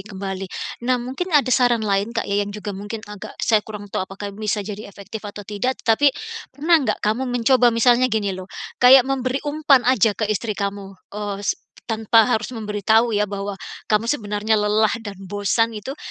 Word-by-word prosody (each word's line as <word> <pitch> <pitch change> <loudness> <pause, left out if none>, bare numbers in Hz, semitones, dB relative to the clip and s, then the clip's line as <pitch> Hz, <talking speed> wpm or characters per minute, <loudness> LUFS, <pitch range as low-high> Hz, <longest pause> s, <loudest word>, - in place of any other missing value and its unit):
kembali. 195 -1 -6 0.4
Nah 255 - +4
mungkin 260 +9 -4
ada 260 -3 +2
saran 240 -3 +3
lain 205 +3 0
Kak 225 - 0
ya 200 +1 0
yang 205 - -2
juga 205 0 -6
mungkin 205 +3 -6
agak 210 -1 -10
saya 215 -2 +4
kurang 210 -1 -8
tahu 185 - -2
apakah 200 +1 -7
bisa 210 0 -2
jadi 210 +1 -7
efektif 200 +2 -9
atau 205 0 -9
tidak, 210 +6 -2
tetapi 245 +5 +5 0.4
pernah 315 +4 +3
nggak 270 - -1
kamu 230 +5 0
mencoba 245 +1 +4
misalnya 240 +2 +4
gini 210 -3 -1
lho, 185 +1 -8 0.3
kayak 250 +1 +8
memberi 260 -1 -1
umpan 290 -3 +3
aja 225 -5 +3
ke 215 - -1
istri 215 0 -3
kamu, 200 -1 -4 0.2
eee, 205 -1 -4
s - - +2 0.4
tanpa 225 +1 +3
harus 235 0 -1
memberitahu 220 0 +1
ya 210 - +2
bahwa 200 0 -5 0.3
kamu 215 +1 +2
sebenarnya 210 -3 0
lelah 210 +1 +2
dan 205 -3 -8
bosan 205 +4 0
itu, 240 +7 -6
215 Hz, 185 wpm, -21 LUFS, 205-245 Hz, 0.4 s, kayak